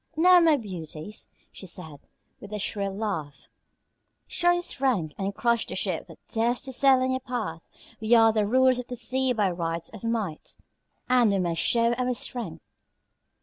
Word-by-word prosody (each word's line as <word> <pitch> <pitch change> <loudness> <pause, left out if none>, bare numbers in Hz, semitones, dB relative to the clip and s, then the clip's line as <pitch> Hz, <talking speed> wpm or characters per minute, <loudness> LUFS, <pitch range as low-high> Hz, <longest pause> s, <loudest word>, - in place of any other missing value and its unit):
"Now, 360 +3 +7
my 325 -3 +5
beauties," 180 - -6 0.2
she 190 - -10
said, 160 -5 -6 0.4
with 205 - -11
a 210 - -3
shrill 200 -1 -2
laugh, 160 -9 -4 0.8
"show 350 0 +1
your 350 0 0
strength 240 - -1
and 195 0 -3
crush 235 -1 +1
the - - -5
ship - - -2
that - - -13
dares 235 +1 0
to 265 -2 -6
sail 260 0 +5
in 260 - 0
your 260 - 0
path. 225 -11 -5 0.3
We 220 +2 +3
are 225 -1 +6
the 215 -2 +1
rulers 255 +2 +4
of 250 - -6
the 250 - -5
sea 255 +2 0
by 210 -6 +1
right 170 -1 -3
of 220 - -10
might 220 -9 -3 0.5
and 250 -3 +4
we 200 - +2
must 170 -3 0
show 235 0 +3
our 250 +1 -1
strength." 200 -11 -5
225 Hz, 180 wpm, -26 LUFS, 190-255 Hz, 0.8 s, Now